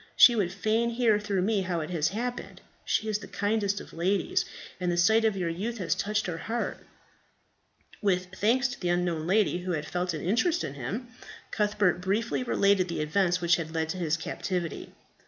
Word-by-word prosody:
She 240 - +8
would 195 -6 0
fain 220 +4 +1
hear 230 -3 +2
through 200 -3 -1
me 205 0 +1
how 180 -3 -2
it 155 - -5
has 165 -2 +1
happened. 245 +5 -4 0.2
She 220 - 0
is 210 -1 0
the - - -10
kindest 205 -1 0
of - - -12
ladies, 185 +4 0 0.3
and 180 -1 0
the 175 - -1
sight 220 +6 +4
of 215 -3 +2
your 180 -2 -1
youth 210 +8 -3
has 175 -6 0
touched 210 +3 -1
her 165 -2 -4
heart." 230 +6 -3 1.2
With 185 -3 +1
thanks 245 +7 +2
to 270 +1 -7
the 180 - -1
unknown 175 -2 0
lady 195 -2 +2
who 180 0 -3
had 150 -2 -2
felt 175 +2 -2
an 150 - -5
interest 315 - +1
in 140 - -4
him, 180 - -5 0.4
Cuthbert 205 -4 +1
briefly 210 +7 0
related 200 -6 +2
the 170 -3 -3
events 180 +3 +1
which 175 0 +4
had 160 -1 -5
led 160 0 0
to 185 - -3
his 165 -2 0
captivity. 170 0 -4
190 Hz, 195 wpm, -28 LUFS, 175-215 Hz, 1.2 s, She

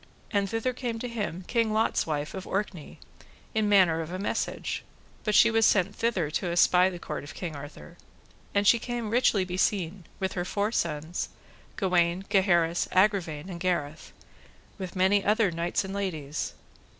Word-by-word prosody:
And 200 -1 +1
thither 225 +3 -1
came 240 -2 -3
to 245 - -4
him, 205 -6 -4
King 230 -2 +1
Lot's 220 -4 +1
wife, 150 -1 -2
of 190 -1 -6
Orkney, 190 -5 -4 0.6
in 215 -1 +1
manner 180 -5 +5
of 160 +1 -6
a 185 - -3
message, 195 - -2 0.4
but 210 -1 0
she 230 - +7
was 225 0 +3
sent 200 -1 +3
thither 190 -10 0
to 180 - -1
espy 180 +1 +4
the 180 - -7
court 155 -4 -5
of 145 - -10
King 170 -4 -5
Arthur; 140 - -10 0.5
and 200 0 +1
she 235 +3 +6
came 235 -2 -4
richly 225 -5 +3
beseen, 185 -1 -1
with 190 -1 -1
her 175 - -2
four 205 +3 -1
sons, 160 -3 -2 0.5
Gawaine, 180 0 +1
Gaheris, 175 -4 +3
Agravine, 185 -5 +2
and 175 -3 -7
Gareth, 170 -4 -2 0.7
with 185 -1 -6
many 190 +2 +3
other 210 -1 +3
knights 170 +3 -1
and 190 - -6
ladies. 165 -7 -3
185 Hz, 165 wpm, -28 LUFS, 170-210 Hz, 0.7 s, she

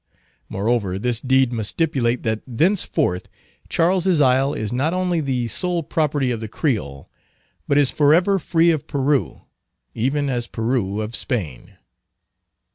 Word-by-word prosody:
Moreover, 100 -2 -1
this 120 +2 -1
deed 130 -1 +2
must 110 -3 -2
stipulate 130 -7 0
that 110 -1 -1
thenceforth 145 - 0 0.4
Charles's 180 0 +2
Isle 135 0 +3
is 110 +1 -3
not 145 +8 0
only 180 -2 0
the 130 -4 -1
sole 175 - -1
property 145 -4 0
of 115 - -3
the 110 - -5
Creole, 105 - -3 0.6
but 140 - +2
is 145 -3 +4
forever 175 +7 +3
free 170 0 +2
of 155 -4 -3
Peru, 140 0 -1 0.5
even 140 +5 -1
as 120 -3 -2
Peru 110 -3 -2
of 110 +2 -1
Spain. 85 - -3
130 Hz, 135 wpm, -21 LUFS, 115-155 Hz, 0.6 s, is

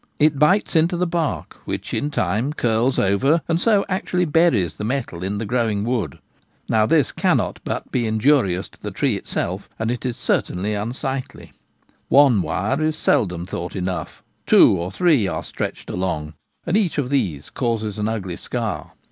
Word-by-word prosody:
It 150 -2 +3
bites 180 +6 +3
into 165 +2 +3
the 180 - +1
bark, 165 -3 -2
which - - -4
in 145 - 0
time 110 +3 -1
curls 120 -1 +1
over 135 - +2
and 165 +1 +1
so 210 -3 +3
actually 185 -1 0
buries 150 - +2
the 105 - -7
metal 115 -7 -3
in 100 +2 -2
the 110 - -3
growing 110 -3 0
wood. 115 - -2 0.5
Now 110 -1 +3
this 150 -4 +3
can - - +2
not - - -2
but - - -4
be 120 -3 0
injurious 110 -5 +2
to - - -23
the - - -4
tree - - 0
itself, 95 +3 -4
and 110 +1 -1
it 125 - -4
is 125 -3 -3
certainly 100 +4 0
unsightly. 125 +5 -4 0.6
One 135 -7 +6
wire 95 - -1
is 155 0 +1
seldom 90 - +1
thought 90 0 -5
enough. 90 -1 -4 0.2
Two - - +7
or 85 +1 -3
three 155 - +3
are 80 -3 -3
stretched - - -5
along, 85 -4 -2 0.3
and 170 - 0
each 200 -8 +1
of 140 -3 -1
these 85 - -1
causes 110 -4 -2
an 105 +1 0
ugly 95 -6 -4
scar. - - -4
115 Hz, 175 wpm, -21 LUFS, 95-150 Hz, 0.6 s, Two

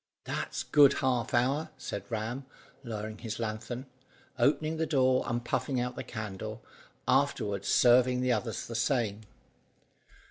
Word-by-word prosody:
"That's - - -3
good 145 -2 +6
half 125 -3 0
an 120 - +4
hour," 145 +5 -1
said 100 -1 -5
Ram, 120 +4 -3 0.4
lowering 110 -2 -5
his 110 -2 -5
lanthorn, 115 +3 -4 0.5
opening 155 +2 +2
the 160 0 0
door, 130 -3 +3
and 120 0 -2
puffing 130 +1 0
out 125 0 -2
the - - -5
candle, 110 0 -6 0.4
afterwards 105 -8 +1
serving 125 +1 +5
the 125 0 +2
others 115 0 -1
the 115 - -7
same. 115 -3 0
120 Hz, 140 wpm, -30 LUFS, 110-130 Hz, 0.5 s, good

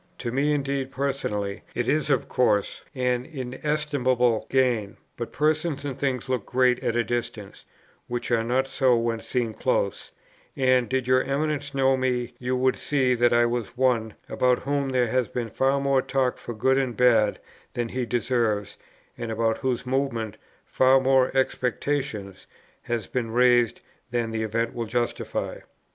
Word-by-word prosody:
To 120 - -4
me 140 +4 +1
indeed 140 -2 -1
personally 120 -8 -2
it 120 -1 -1
is 155 0 +1
of 135 -4 +1
course 105 -5 +1
an 125 -1 0
inestimable 130 -3 0
gain; 120 -5 +1 0.2
but 120 - -5
persons 155 -1 0
and 140 -2 -3
things 130 -2 -2
look 130 -5 -1
great 125 +1 +2
at 115 - 0
a 120 - +2
distance, 115 -3 -5 0.4
which 120 0 -4
are 115 -1 +3
not 125 +3 +1
so 130 -2 +2
when 115 0 -1
seen 120 -1 -2
close; - - -1 0.5
and, 130 -2 +3
did 130 -1 -1
your 130 0 +4
Eminence 145 +1 -2
know 135 0 +3
me, 125 -2 -1
you 125 +1 -1
would 130 0 +2
see 130 -4 +1
that 120 0 +3
I 120 0 +4
was 120 0 -3
one, 120 -4 +1
about 125 -1 +1
whom 140 0 -1
there 125 -3 +1
has 125 -1 +1
been 120 0 -4
far 135 +4 +2
more 140 -1 +2
talk 130 -1 0
for 120 - -7
good 130 +5 +2
and 130 -3 -2
bad 115 -4 +4 0.4
than 120 -1 -2
he 125 +1 -2
deserves, 115 -4 0 0.4
and 115 -1 -4
about 115 0 0
whose 130 -2 -1
movements 125 -5 -2 0.3
far 130 +1 +4
more 130 -1 +3
expectation 130 -5 -1 0.5
has 120 -4 -3
been 120 0 -3
raised 120 0 +3 0.3
than 120 -1 -1
the 110 0 -2
event 115 +2 -1
will 115 -1 -4
justify. 120 +1 -2
125 Hz, 160 wpm, -25 LUFS, 115-135 Hz, 0.5 s, your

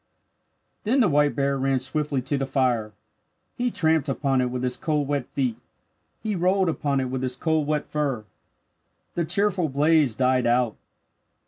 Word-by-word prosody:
Then 245 +6 +2
the 230 - +5
white 145 -2 +2
bear 140 -1 0
ran 135 0 +1
swiftly 140 0 -1
to 140 +3 -1
the 135 -1 -1
fire. 125 -6 0 0.6
He 245 0 0
tramped 160 - +1
upon 135 -1 +1
it 125 - 0
with 125 0 -4
his 125 -1 -1
cold 150 -3 -1
wet 140 -3 -1
feet. 130 -5 -2 0.7
He 215 -2 -1
rolled 185 +1 +2
upon 145 -3 0
it 130 -1 -2
with 130 -1 -2
his 130 -1 -3
cold 160 -2 0
wet 150 -1 -1
fur. 140 -7 -2 0.9
The 170 - -1
cheerful 185 -1 +1
blaze 145 -2 +3
died 130 -1 +2
out. 120 -2 +2
140 Hz, 165 wpm, -25 LUFS, 130-160 Hz, 0.9 s, the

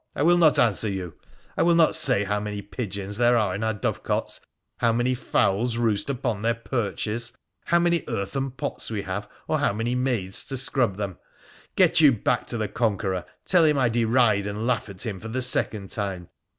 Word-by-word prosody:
I 145 - 0
will 175 +2 +5
not 155 -3 +5
answer 110 -2 +3
you! 95 -4 -4 0.4
I - - 0
will 170 0 +4
not 165 -2 +4
say 130 -9 +2
how 105 +1 -1
many 105 -1 -5
pigeons 100 -2 -5
there 120 0 +4
are 105 -5 +1
in 100 - -3
our 110 -1 0
dovecotes— 105 - -2 0.4
how 115 - +3
many 120 +3 +1
fowls 115 -2 0
roost 115 0 0
upon 120 -6 -2
their 115 +1 +1
perches 115 0 -2 0.2
— - - -47
how 170 - +3
many 170 -2 +2
earthen 135 +8 -2
pots 125 -1 -4
we 105 -3 -3
have, 100 +2 -5 0.2
or - - +1
how - - +1
many 115 +3 -2
maids 125 -7 0
to 135 - -3
scrub 125 -6 0
them! 100 -4 -4 0.6
Get - - +4
you 150 -3 +8
back 120 +1 0
to 120 - -3
the 110 -1 -1
Conqueror: 100 -6 -1 0.2
tell 180 -3 +4
him 150 -2 +3
I 125 -3 +3
deride 115 -3 +2
and 105 +2 -4
laugh 125 -3 0
at 95 -2 -6
him 100 -4 -4
for 110 - -8
the 120 +3 -3
second 105 -5 -1
time. 95 -4 -4
115 Hz, 205 wpm, -25 LUFS, 100-125 Hz, 0.6 s, you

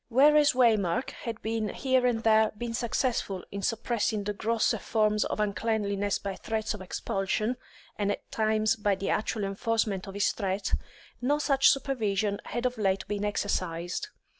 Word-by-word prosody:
Whereas 290 +4 +5
Waymark 230 -3 +2
had 230 -2 -6
here 230 +4 +1
and 230 -2 0
there 220 -1 +4
been 235 +1 -4
successful 230 -5 -1
in 200 - -4
suppressing 220 0 0
the 210 +1 -2
grosser 220 +2 +1
forms 215 -1 +1
of - - -3
uncleanliness 205 -1 0
by 195 -1 -5
threats 220 -1 -2
of 210 - -8
expulsion, 195 +5 -1 0.4
and 205 0 +1
at - - -6
times 215 0 +2
by 205 -2 +1
the 195 +1 -2
actual 215 0 -1
enforcement 200 0 -1
of 195 - -8
his 200 - +2
threat, 195 -1 -2 0.5
no 285 +4 +2
such 275 -2 +4
supervision 215 -7 0
had 240 +1 -3
of 250 -2 -1
late 195 -2 0
been 205 0 -2
exercised. 185 - -2
215 Hz, 155 wpm, -28 LUFS, 200-230 Hz, 0.5 s, Whereas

